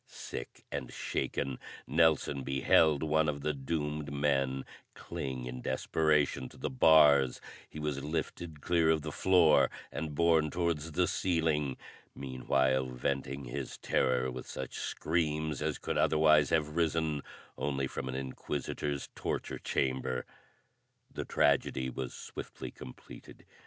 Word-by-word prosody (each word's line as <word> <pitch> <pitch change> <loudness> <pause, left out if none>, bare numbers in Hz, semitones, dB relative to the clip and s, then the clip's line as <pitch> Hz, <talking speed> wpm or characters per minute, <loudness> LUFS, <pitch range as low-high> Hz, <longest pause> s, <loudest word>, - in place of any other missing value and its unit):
Sick - - -8
and 70 -3 -4
shaken, 65 -3 -2 0.3
Nelson 75 -2 +2
beheld 70 +3 +3
one 80 0 +2
of 70 -1 -3
the 75 +2 0
doomed 75 +1 -3
men 70 -2 0 0.3
cling 65 -2 -5
in 60 0 -6
desperation 75 0 +1
to - - -16
the - - -3
bars; 70 -1 +6 0.3
he - - -10
was 75 -2 -2
lifted 80 0 -4
clear 85 -2 +2
of 80 -2 +2
the 75 - -4
floor 90 -2 +5 0.2
and 75 -2 -4
borne 80 -1 +4
towards 80 -2 -1
the 90 +3 +3
ceiling, 80 -7 0 0.4
meanwhile 65 0 +1
venting 70 +2 -3
his 65 +2 -5
terror 65 0 +1
with - - -7
such 65 - -6
screams 80 -2 -1
as - - -1
could - - -2
otherwise 75 -2 +5
have 75 -2 +1
risen 80 -3 +1 0.3
only 70 -1 -1
from 65 0 -5
an 65 - -4
inquisitor's 70 +1 -3
torture - - -3
chamber. 65 -1 -1 0.9
The - - -4
tragedy 65 -2 +2
was 65 0 -5
swiftly - - -7
completed. 65 -1 -12
75 Hz, 130 wpm, -32 LUFS, 65-80 Hz, 0.9 s, bars